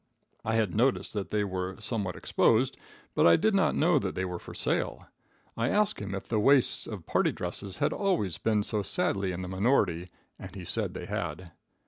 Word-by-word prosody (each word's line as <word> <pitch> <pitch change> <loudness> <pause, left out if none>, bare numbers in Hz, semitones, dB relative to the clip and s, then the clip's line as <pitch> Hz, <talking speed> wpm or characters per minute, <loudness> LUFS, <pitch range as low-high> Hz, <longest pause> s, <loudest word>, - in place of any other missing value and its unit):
I 110 +1 0
had 110 -6 +1
noticed 125 +5 +1
that 100 -2 -3
they 105 -1 0
were 95 -1 -3
somewhat 100 -7 0
exposed, 125 +4 +2 0.4
but - - +4
I 85 - +7
did 220 +1 +2
not 195 - +2
know 170 +3 +3
that 95 -2 -3
they 95 - -1
were 90 -1 -4
for - - -11
sale. - - -1 0.5
I 115 +2 0
asked 210 +3 +2
him 100 -1 -4
if 95 - -7
the 110 - 0
waists 135 +4 +4
of 100 -7 -7
party - - +2
dresses 95 -2 -5
had - - +1
always 105 - 0
been 105 0 +1
so 105 0 -1
sadly 95 0 0
in 90 +1 -5
the - - -5
minority, 95 -3 +1 0.3
and - - -9
he - - -7
said - - -3
they - - -5
had. 90 -4 -4
100 Hz, 200 wpm, -29 LUFS, 95-115 Hz, 0.5 s, I